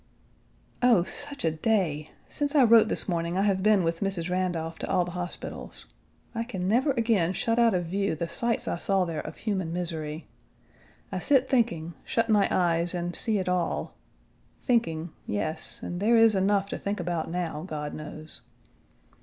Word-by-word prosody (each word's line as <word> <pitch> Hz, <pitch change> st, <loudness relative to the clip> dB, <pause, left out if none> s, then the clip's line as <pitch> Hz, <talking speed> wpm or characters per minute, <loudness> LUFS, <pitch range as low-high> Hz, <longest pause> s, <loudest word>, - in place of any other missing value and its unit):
Oh, 240 Hz, -8 st, +5 dB
such 285 Hz, +3 st, -5 dB
a 160 Hz, -, +3 dB
day! 160 Hz, -4 st, 0 dB, 0.2 s
Since 290 Hz, 0 st, -1 dB
I 280 Hz, -, +7 dB
wrote 230 Hz, -2 st, +7 dB
this -, -, 0 dB
morning, 170 Hz, -1 st, -1 dB
I 195 Hz, -, +2 dB
have 195 Hz, -2 st, +2 dB
been 210 Hz, -2 st, +4 dB
with 165 Hz, 0 st, -1 dB
Mrs. 185 Hz, -3 st, -2 dB
Randolph 175 Hz, -3 st, -2 dB
to -, -, -4 dB
all 180 Hz, -2 st, +2 dB
the 175 Hz, -, -6 dB
hospitals. 175 Hz, 0 st, -6 dB, 0.5 s
I 230 Hz, -1 st, -1 dB
can 190 Hz, -6 st, -4 dB
never 245 Hz, +8 st, +3 dB
again 220 Hz, -8 st, +2 dB
shut 230 Hz, +3 st, 0 dB
out 230 Hz, -4 st, +4 dB
of 175 Hz, -1 st, 0 dB
view 195 Hz, +1 st, -1 dB
the 170 Hz, +2 st, -3 dB
sights 235 Hz, +6 st, -1 dB
I 170 Hz, -, -2 dB
saw 195 Hz, -1 st, +1 dB
there 165 Hz, -3 st, -3 dB
of -, -, -6 dB
human 190 Hz, -6 st, -2 dB
misery. 165 Hz, -3 st, -3 dB, 0.9 s
I -, -, -2 dB
sit 270 Hz, -3 st, +3 dB
thinking, 175 Hz, -11 st, +1 dB
shut 230 Hz, 0 st, 0 dB
my 210 Hz, -2 st, +4 dB
eyes, 170 Hz, 0 st, +1 dB
and 175 Hz, 0 st, -2 dB
see 220 Hz, -3 st, +1 dB
it 185 Hz, -, -2 dB
all; 180 Hz, -2 st, -1 dB, 0.7 s
thinking, 170 Hz, -, 0 dB, 0.2 s
yes, 155 Hz, +10 st, -3 dB
and 175 Hz, -, -4 dB
there 225 Hz, +4 st, +4 dB
is 225 Hz, -1 st, +6 dB
enough 195 Hz, 0 st, +2 dB
to -, -, -4 dB
think 200 Hz, 0 st, -3 dB
about 170 Hz, -2 st, -2 dB
now, 165 Hz, -3 st, -3 dB
God 150 Hz, -3 st, -4 dB
knows. 155 Hz, +1 st, -8 dB
180 Hz, 180 wpm, -27 LUFS, 165-220 Hz, 0.9 s, I